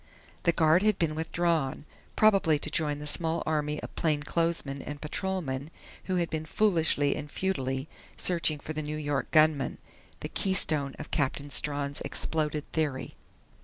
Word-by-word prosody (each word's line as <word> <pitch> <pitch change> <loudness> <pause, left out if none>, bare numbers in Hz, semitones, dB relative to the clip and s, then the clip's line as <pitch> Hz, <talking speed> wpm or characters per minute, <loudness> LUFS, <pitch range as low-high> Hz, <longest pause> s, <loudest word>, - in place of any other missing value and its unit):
The 170 - +3
guard 160 +1 +4
had 210 -1 +2
been 160 -2 0
withdrawn, 160 -3 -1 0.3
probably 195 -7 +4
to 150 +1 -5
join 150 -3 +1
the 150 - -7
small 165 +2 +1
army 150 -1 -1
of - - -8
plainclothesmen 150 -2 0
and 145 +1 -7
patrolmen 150 -4 -3 0.4
who 185 - -1
had 170 -2 0
been 155 0 -3
foolishly 160 -6 +2
and 150 - -6
futilely 135 -7 -2 0.3
searching 170 -4 +3
for 150 +2 -7
the 155 - -3
New 150 0 -4
York 145 -2 -2
gunman 155 -4 +3 0.4
the - - -5
keystone 155 -8 +1
of - - -9
Captain 145 0 -1
Strawn's 145 -1 +1
exploded 155 -2 0
theory. 145 -5 -2
155 Hz, 150 wpm, -28 LUFS, 145-170 Hz, 0.4 s, guard